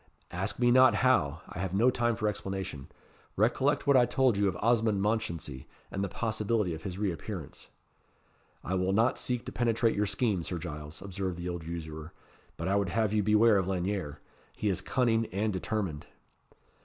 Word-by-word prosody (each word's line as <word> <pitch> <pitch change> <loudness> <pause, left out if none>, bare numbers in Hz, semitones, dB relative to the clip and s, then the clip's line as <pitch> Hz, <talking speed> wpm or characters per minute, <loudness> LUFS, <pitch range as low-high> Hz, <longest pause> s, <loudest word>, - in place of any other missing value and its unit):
"Ask 95 +4 -2
me 120 0 +3
not 130 +1 +6
how 80 - +2
I - - -8
have 95 0 -2
no 120 +6 +4
time 120 -2 +1
for 110 -1 -1
explanation. 95 -8 -4 0.5
Recollect - - +2
what 140 - +4
I 125 -2 +6
told 130 -4 +2
you 100 0 +2
of 95 - -1
Osmond 110 -2 +2
Mounchensey, 95 - -2 0.2
and 100 - -2
the 100 - -2
possibility 110 -3 -1
of 80 - -7
his 90 +1 -5
re 100 -2 0
appearance." 85 -2 -7 1.0
"I 90 - -3
will 95 +1 +1
not 115 +5 +2
seek 125 -1 -1
to - - -5
penetrate 115 -1 +1
your 105 0 +1
scheme, 100 -6 0
Sir 90 - -4
Giles," 75 0 -7
observed 95 -2 -4
the 85 0 -5
old 85 -2 -4
usurer; 80 -1 -7 0.4
"but 85 - -3
I 100 +1 +2
would 100 -2 0
have 110 +2 0
you 105 - +3
beware 105 +1 +5
of 95 -2 0
Lanyere. 95 -5 -2 0.4
He 105 - -1
is 95 - -1
cunning 115 -3 +1
and 105 +3 -1
determined." 95 -4 -3
100 Hz, 185 wpm, -30 LUFS, 85-110 Hz, 1.0 s, not